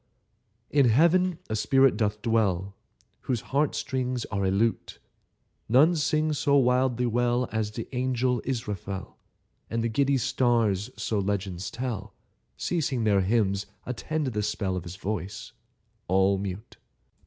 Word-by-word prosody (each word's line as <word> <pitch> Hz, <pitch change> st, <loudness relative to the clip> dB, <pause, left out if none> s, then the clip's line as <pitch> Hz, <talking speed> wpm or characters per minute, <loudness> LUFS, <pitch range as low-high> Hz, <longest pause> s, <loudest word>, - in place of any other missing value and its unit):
] -, -, -48 dB, 0.3 s
IN 140 Hz, -4 st, +4 dB
Heaven 170 Hz, +7 st, +3 dB
a 110 Hz, -, -2 dB
spirit 135 Hz, +5 st, +4 dB
doth 105 Hz, -2 st, -1 dB
dwell 100 Hz, -5 st, +1 dB, 0.5 s
Whose 120 Hz, -4 st, -1 dB
heart 145 Hz, +1 st, +2 dB
strings 125 Hz, -2 st, -2 dB
are 100 Hz, -1 st, -1 dB
a -, -, +2 dB
lute; 110 Hz, +4 st, 0 dB, 0.7 s
None 150 Hz, +9 st, +5 dB
sing 155 Hz, 0 st, +1 dB
so 140 Hz, -1 st, +2 dB
wildly 125 Hz, -1 st, +2 dB
well 120 Hz, +1 st, +1 dB
As 110 Hz, -1 st, -1 dB
the 110 Hz, +1 st, -6 dB
angel 125 Hz, -1 st, 0 dB
Israfel, 105 Hz, -6 st, -5 dB, 0.5 s
And 115 Hz, 0 st, -1 dB
the 115 Hz, -, 0 dB
giddy 140 Hz, +4 st, +2 dB
stars 115 Hz, -5 st, +1 dB
(so 110 Hz, 0 st, -1 dB
legends 95 Hz, -2 st, -2 dB
tell), 120 Hz, -4 st, -5 dB, 0.4 s
Ceasing 140 Hz, -8 st, -1 dB
their 100 Hz, -3 st, +3 dB
hymns, 100 Hz, -1 st, +1 dB, 0.2 s
attend 150 Hz, +5 st, -3 dB
the 110 Hz, -5 st, -1 dB
spell 100 Hz, -2 st, -2 dB
Of 90 Hz, 0 st, -4 dB
his 85 Hz, +1 st, -7 dB
voice, 100 Hz, +1 st, -5 dB, 0.6 s
all 95 Hz, +1 st, +3 dB
mute. 100 Hz, +3 st, -6 dB
115 Hz, 140 wpm, -27 LUFS, 100-130 Hz, 0.7 s, None